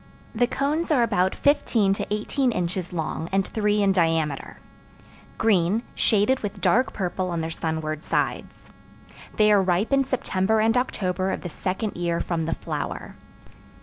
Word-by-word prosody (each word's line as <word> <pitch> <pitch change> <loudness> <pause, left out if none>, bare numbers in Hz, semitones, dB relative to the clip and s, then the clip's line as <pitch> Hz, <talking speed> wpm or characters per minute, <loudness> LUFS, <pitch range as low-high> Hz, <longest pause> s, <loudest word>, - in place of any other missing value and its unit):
The 240 +1 +2
cones 295 +6 -1
are 275 -6 +4
about 185 -4 +1
fifteen 235 -8 +2
to 200 - -5
eighteen 245 +5 0
inches 180 -2 -2
long, 160 -1 -3
and 195 0 +2
three 210 -1 +1
in 195 - +4
diameter; 165 -5 0 0.8
green, 210 0 +2
shaded 220 +4 +2
with 205 -2 -5
dark 255 +2 +2
purple 185 -1 -2
on 170 -2 -2
their 160 +1 -3
sunward 160 -2 -3
sides. - - -3 0.7
They 210 0 +5
are 205 -2 +5
ripe 190 +6 +1
in 275 0 +4
September 220 -5 0
and 225 +1 +3
October 190 -7 -1
of - - -3
the 175 - -5
second 190 +6 -3
year 170 -1 -1
from 165 -2 -2
the 165 - -1
flower. - - -5
195 Hz, 155 wpm, -24 LUFS, 175-225 Hz, 0.8 s, They